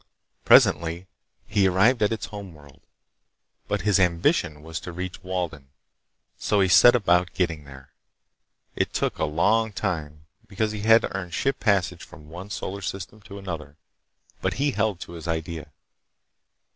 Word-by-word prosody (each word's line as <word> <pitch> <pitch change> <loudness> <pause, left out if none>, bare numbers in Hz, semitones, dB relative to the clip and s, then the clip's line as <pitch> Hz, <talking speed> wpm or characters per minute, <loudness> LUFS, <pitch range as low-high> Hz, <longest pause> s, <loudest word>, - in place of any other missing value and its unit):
Presently 85 +3 +4 0.4
he 100 -2 +2
arrived 105 +7 +3
at 105 - +3
its 115 - -3
home 100 -5 -9
world. 70 -2 -17 0.9
But 105 -2 -1
his 100 +1 +2
ambition 85 -4 +1
was 80 -1 -5
to 90 - -8
reach 90 +1 -6
Walden, 90 -7 -4 0.7
so 105 - +1
he 95 -1 +3
set 120 +7 +7
about 90 -6 +2
getting 85 -5 -1
there. 65 -1 -14 0.8
It - - -1
took - - -1
a - - +2
long 105 +9 +2
time 75 -5 -4 0.2
because 105 +2 -1
he 105 - -5
had 110 +1 +5
to - - -4
earn 95 -2 -4
ship 135 +9 -1
passage 100 -5 +1
from 75 0 -14
one 90 +5 -9
solar 100 -2 -5
system 95 +3 -6
to 100 -1 -11
another, 80 -7 -7 0.6
but - - -1
he 140 +2 +1
held 110 -6 -1
to - - -8
his 85 -1 -8
idea. 80 -2 -4
90 Hz, 160 wpm, -25 LUFS, 80-105 Hz, 0.9 s, set